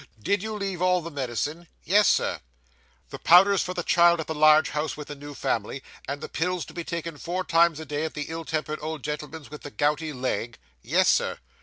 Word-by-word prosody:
Did 190 - 0
you 220 +1 -4
leave 195 -4 -3
all 180 0 +3
the 170 +1 -7
medicine?' 145 +5 -3 0.2
Yes, 205 +3 +4
Sir.' - - +2 0.7
'The - - -7
powders 190 +3 +6
for 180 - -4
the 175 - -2
child, 170 -1 +5
at 160 - -3
the 160 - -3
large 155 0 +5
house 150 -1 -2
with 150 - -8
the 145 - -5
new 145 0 -10
family, 115 +4 -2 0.2
and 140 +2 -4
the - - -5
pills 180 +1 -2
to - - -13
be 170 - -5
taken 170 -2 -5
four 180 +4 -3
times 165 -2 +3
a 160 - -7
day 150 +1 -3
at 160 - -4
the 150 -1 -3
ill 165 0 -5
tempered 155 -1 -3
old 155 -2 -5
gentleman's 150 0 -6
with 150 - -9
the - - -7
gouty 150 +2 0
leg?' 125 -3 -3 0.2
'Yes, - - +2
sir. - - +2
160 Hz, 220 wpm, -26 LUFS, 150-175 Hz, 0.7 s, powders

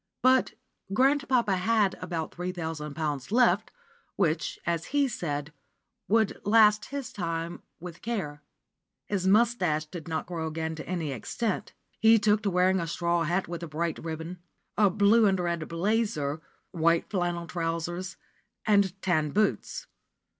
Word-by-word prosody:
But 260 0 +4 0.4
grandpapa 255 -5 +3
had 205 +1 +2
about 170 -3 -4
three 180 +1 -3
thousand 160 -4 -5
pounds 150 -3 -3
left, 225 -2 +3 0.5
which, 165 -4 0
as 170 -1 -1
he 285 -1 +2
said, 150 - -4 0.5
would 220 -1 +2
last 210 0 +5
his 280 -3 -6
time 165 -2 -3 0.2
with 175 0 -9
care. 185 -11 -3 0.6
His 190 -2 -1
moustache 190 -8 +3
did 165 +1 -9
not 160 -1 -2
grow 165 -2 -4
again 160 0 -3
to 160 - -8
any 170 -5 -2
extent. 190 - -3 0.3
He 225 +1 +7
took 210 0 +3
to 205 - 0
wearing 185 +1 +3
a 165 - -2
straw 170 0 0
hat 175 +4 0
with 170 0 -5
a 170 - -5
bright 160 +2 -2
ribbon, 165 +2 -6 0.4
a 205 -1 +5
blue 205 +3 +4
and 190 -1 +2
red 170 -3 -2
"blazer," 165 -5 -1 0.3
white 170 0 +2
flannel 175 -3 -1
trousers, 175 +2 -3 0.5
and 200 -3 +3
tan 155 -5 +2
boots. 210 +7 0
175 Hz, 145 wpm, -28 LUFS, 165-210 Hz, 0.6 s, He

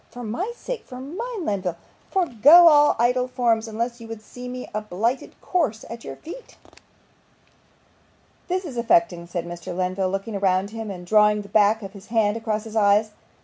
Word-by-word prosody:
'For 245 - -9
my 245 - -3
sake - - -6
for 250 -1 -10
mine, 380 - -5
Lenville 185 -4 -2 0.3
forego 335 - +6
all 295 -2 +6
idle 250 +2 +2
forms, 235 -3 0
unless 235 +2 -4
you 230 - -9
would 225 -1 -8
see 245 +3 -10
me 250 0 -6
a 215 - -2
blighted 215 +5 -3
corse 280 - -1
at 230 0 -8
your - - -7
feet.' 355 +11 -11 1.9
'This 370 +1 -2
is 270 -7 -7
affecting!' 225 -7 +2
said 175 -1 -4
Mr. 175 +1 -7
Lenville, 185 +1 -1
looking 195 +2 -3
round 190 +1 +1
him, 225 -1 -6
and 180 -2 -7
drawing 210 +1 +4
the 200 - -14
back 215 +1 +3
of 195 0 -8
his 200 -1 -13
hand 220 -2 +1
across 220 -2 -2
his 225 -1 -10
eyes. 210 0 +3
225 Hz, 180 wpm, -23 LUFS, 200-250 Hz, 1.9 s, forego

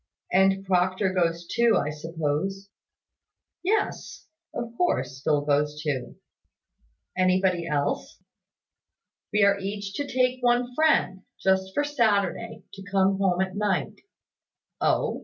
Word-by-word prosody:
"And 195 +1 +3
Proctor 185 +1 +1
goes 170 -2 0
too, 235 +4 +3
I 150 - -1
suppose?" 165 +5 -3 0.9
"Yes; 410 +4 -2 0.3
of 235 -1 -6
course, 185 - -1
Phil 150 -2 +2
goes 150 +1 +1
too." 140 -5 -3 1.0
"Anybody 185 -1 +2
else?" 145 -2 -2 1.1
"We 210 0 +3
are 200 0 +4
each 200 0 -5
to 285 - -2
take 255 -1 +1
one 245 0 +2
friend, 280 -10 +2 0.2
just 190 0 +1
for 290 - +2
Saturday, 225 -6 0
to 195 - -10
come 195 0 +2
home 190 -2 +2
at 190 0 -2
night." 205 -3 0 0.9
"Oh? - - +1
190 Hz, 120 wpm, -26 LUFS, 170-215 Hz, 1.1 s, are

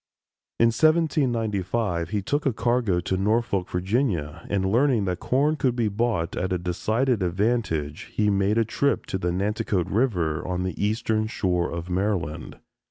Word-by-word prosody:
In 115 - +5
1795 115 - +1
he 105 -2 -2
took 145 +7 0
a 135 - +1
cargo 115 -5 +1
to 95 +2 -1
Norfolk, 100 -2 0
Virginia, 90 - -1
and 100 -2 0
learning 120 -3 +3
that 90 -1 -2
corn 145 +4 +1
could 130 -4 +1
be 115 -3 +1
bought 105 -6 -1
at 95 +1 -2
a 90 - +1
decided 110 +7 0
advantage, 90 -5 -1
he 105 -1 +1
made 100 +2 +1
a 115 - +3
trip 140 +5 0
to 95 - -3
the 90 -1 -1
Nanticoke 100 0 -1
River, 90 - 0
on 90 0 -2
the 95 +2 -3
eastern 110 0 0
shore 90 -5 0
of 85 0 -5
Maryland. 90 -4 -2
105 Hz, 160 wpm, -25 LUFS, 90-120 Hz, -, In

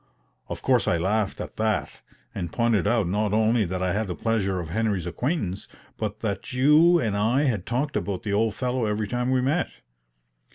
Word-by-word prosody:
Of - - -6
course - - +2
I - - +2
laughed 100 +4 0
at - - -7
that, 110 -1 -1 0.3
and 85 -2 -4
pointed 115 -3 +1
out 110 -4 +2
not 105 +3 0
only 110 0 +3
that 95 +1 -3
I 90 -1 0
had 105 +1 -1
the 90 - -4
pleasure 100 -5 0
of 85 -2 -5
Henry's 100 -2 -1
acquaintance, 100 - -2 0.3
but 105 -1 -4
that 105 +2 -3
you 150 +7 +5
and 110 -8 -1
I 115 +7 +2
had 115 -10 -1
talked 135 +5 -1
about 100 -3 -2
the 105 - -2
old 110 0 +1
fellow 125 0 -1
every 105 0 -1
time 125 +3 -1
we 130 -1 +2
met. 150 +7 0
110 Hz, 195 wpm, -25 LUFS, 100-125 Hz, 0.3 s, you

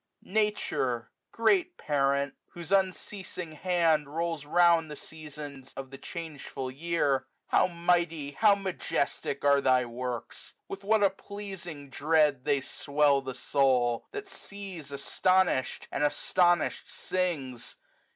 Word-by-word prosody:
Nature! 190 - 0 0.2
great 355 +8 +2
parent! 140 -1 +1 0.2
whose 170 0 -8
unceasing 190 -2 -1
hand 160 -2 +2
Rolls 165 -1 -2
round 170 0 +4
the 150 - -6
Seasons 145 -4 -9
of 135 -1 -6
the 135 - -8
changeful 150 -6 -6
year. 145 -2 0 0.2
How - - +4
mighty, 170 -4 0
how 205 +7 +5
majestic, 175 -7 -2
are 140 0 +5
thy 130 -2 +4
works! 120 0 -6
With 195 - -7
what 215 +1 +3
a 195 - +5
pleasing 190 -8 -8
dread 150 -3 +2
they 140 -2 +2
swell 140 +1 +2
the 130 -1 -6
soul! 125 -4 +2
That 415 -1 -6
sees 195 - -8
astonish'd! 185 +1 +1
and - - -1
astonish'd 175 +3 +2
sings 150 -10 -3
155 Hz, 120 wpm, -29 LUFS, 140-185 Hz, 0.2 s, how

